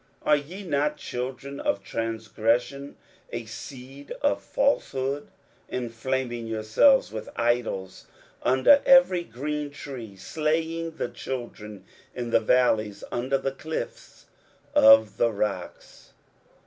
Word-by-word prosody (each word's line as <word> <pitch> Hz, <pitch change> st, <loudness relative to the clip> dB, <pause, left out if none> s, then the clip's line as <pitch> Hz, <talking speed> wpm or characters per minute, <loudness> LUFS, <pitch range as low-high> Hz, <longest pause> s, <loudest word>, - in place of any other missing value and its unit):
are 150 Hz, -, +5 dB
ye 165 Hz, +8 st, -6 dB
not 150 Hz, -3 st, 0 dB
children 130 Hz, +3 st, -5 dB
of 100 Hz, -1 st, -1 dB
transgression, 115 Hz, +5 st, -1 dB, 0.4 s
a 120 Hz, -1 st, -4 dB
seed 130 Hz, +4 st, -10 dB
of 285 Hz, -, +2 dB
falsehood. 145 Hz, -, 0 dB, 0.4 s
23:057:005 125 Hz, -, -2 dB
Enflaming 120 Hz, 0 st, -3 dB
yourselves 115 Hz, -, +3 dB
with 110 Hz, 0 st, -6 dB
idols 115 Hz, -6 st, -1 dB, 0.3 s
under 130 Hz, -, +5 dB
every 265 Hz, -10 st, +6 dB
green 150 Hz, +3 st, -4 dB
tree, 130 Hz, -7 st, -8 dB
slaying 160 Hz, -, -1 dB
the -, -, -1 dB
children 105 Hz, -6 st, -7 dB, 0.3 s
in 120 Hz, -2 st, -4 dB
the -, -, +5 dB
valleys 110 Hz, -3 st, +2 dB
under 130 Hz, +3 st, 0 dB
the 135 Hz, 0 st, -2 dB
clifts 155 Hz, +4 st, -6 dB, 0.5 s
of 110 Hz, -1 st, +7 dB
the 115 Hz, -, +3 dB
rocks? 100 Hz, -4 st, -5 dB
125 Hz, 110 wpm, -26 LUFS, 115-145 Hz, 0.5 s, of